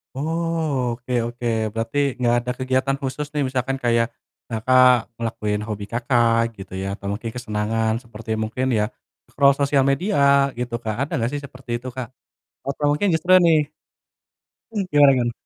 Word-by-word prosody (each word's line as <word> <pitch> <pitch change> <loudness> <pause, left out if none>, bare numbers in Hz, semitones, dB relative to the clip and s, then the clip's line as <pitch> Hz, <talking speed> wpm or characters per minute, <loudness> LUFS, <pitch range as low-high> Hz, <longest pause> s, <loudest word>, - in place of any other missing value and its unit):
Oh, 155 -5 -1
oke 125 +1 -6
oke, 120 +1 -6 0.3
berarti 115 +4 -3 0.3
gak 120 - +4
ada 125 +1 -3
kegiatan 130 +1 0
khusus 135 +2 -3
nih 145 -1 0
misalkan 130 +1 -1
kayak 115 -1 +3 0.4
Kakak 125 +1 +4 0.2
ngelakuin 105 -2 -2
hobi 105 -2 -4
Kakak 120 -1 +2 0.2
gitu 95 -1 -10
ya, - - -3
atau 100 - -13
mungkin 115 +2 -5
kesenangan 110 -1 -1
seperti 115 -1 -8
mungkin 120 +4 -2
ya 105 - +2 0.5
scroll 140 -1 +4
sosial 140 -1 +3
media 180 +9 0 0.4
gitu 125 0 -4
Kak, 110 -1 -2
ada 145 - -6
gak 115 - +1
sih 145 - -3
seperti 125 -3 -5
itu 120 - -9
Kak? 130 -2 -4 0.6
Atau 140 +2 -3
mungkin 200 +8 +1
justru 160 +3 +1
nih 155 -3 +3 1.0
Mmm, 210 -3 -1
gimana 145 -1 +7
gimana? 120 -2 +1
125 Hz, 160 wpm, -22 LUFS, 115-140 Hz, 1.0 s, gimana